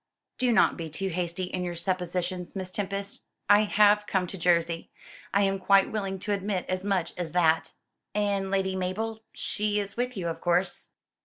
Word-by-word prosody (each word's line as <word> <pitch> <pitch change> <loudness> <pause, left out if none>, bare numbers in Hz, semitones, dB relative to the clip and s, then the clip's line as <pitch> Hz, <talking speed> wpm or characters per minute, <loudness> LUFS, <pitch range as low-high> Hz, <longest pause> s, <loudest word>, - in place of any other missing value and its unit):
"Do 250 -1 +3
not 230 - +4
be 165 -2 -5
too 190 +6 -3
hasty 175 +1 -2
in 180 0 -3
your 175 -1 -3
suppositions, 180 0 -2
Miss 185 -1 -4
Tempest. 200 0 -3 0.2
I 205 +1 +6
have 210 0 +4
come 190 -2 +1
to 180 - -6
Jersey 170 -2 +1 0.4
I 200 +1 +3
am 195 0 +1
quite 195 0 +4
willing 195 -3 -2
to 205 0 -1
admit 195 -2 -1
as 185 0 -2
much 195 -4 0
as 170 -3 -4
that." 165 -2 +3 0.4
"And 200 -2 +1
Lady 190 -1 0
Mabel? 215 +5 -2
She 210 0 -1
is 200 -1 -4
with 250 -1 -1
you, 175 -3 -2
of 165 0 -4
course?" 175 +2 0
190 Hz, 180 wpm, -28 LUFS, 180-205 Hz, 0.4 s, I